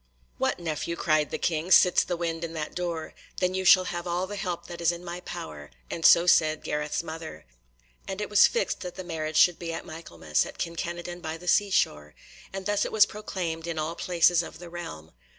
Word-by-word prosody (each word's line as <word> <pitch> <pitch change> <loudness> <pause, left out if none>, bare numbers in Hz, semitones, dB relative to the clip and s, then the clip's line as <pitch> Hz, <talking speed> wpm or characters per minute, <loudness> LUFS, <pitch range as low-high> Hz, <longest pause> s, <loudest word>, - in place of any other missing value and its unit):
"What, - - +1
nephew," 170 0 -3
cried 155 -3 +1
the - - -3
King, 165 +1 -1
"sits 180 -1 +6
the 175 - -3
wind 165 -1 -3
in 165 -1 -4
that 155 -2 -4
door? 170 -3 -4 0.3
Then 180 0 +1
you 190 0 -1
shall 185 0 +7
have 175 -1 -4
all 175 +2 -1
the 205 - -7
help 180 -4 -4
that 175 0 -8
is 170 0 +3
in 175 +1 -8
my 175 0 -5
power," 75 - -8 0.2
and 165 - -4
so 170 +2 +7
said 155 -3 +3
Gareth's 150 +2 -2
mother. 160 - -8 0.6
And 190 +1 -4
it 210 - -2
was 210 - +6
fixed 480 - -1
that 180 -2 -7
the 185 - -6
marriage 160 -3 -3
should 175 -2 +5
be 170 -1 -4
at 165 - -5
Michaelmas, 85 - -2
at - - -9
Kin 170 0 -3
Kenadon 175 +1 -5
by 160 -1 -4
the 180 +2 -13
seashore, 75 - +1 0.4
and 195 0 -6
thus 205 0 +1
it - - -3
was 215 -2 +6
proclaimed 175 -6 -5
in 165 -1 -3
all 155 +2 -2
places 175 -1 +3
of 160 - -9
the 175 0 -11
realm. 80 - -8
170 Hz, 220 wpm, -27 LUFS, 160-180 Hz, 0.6 s, shall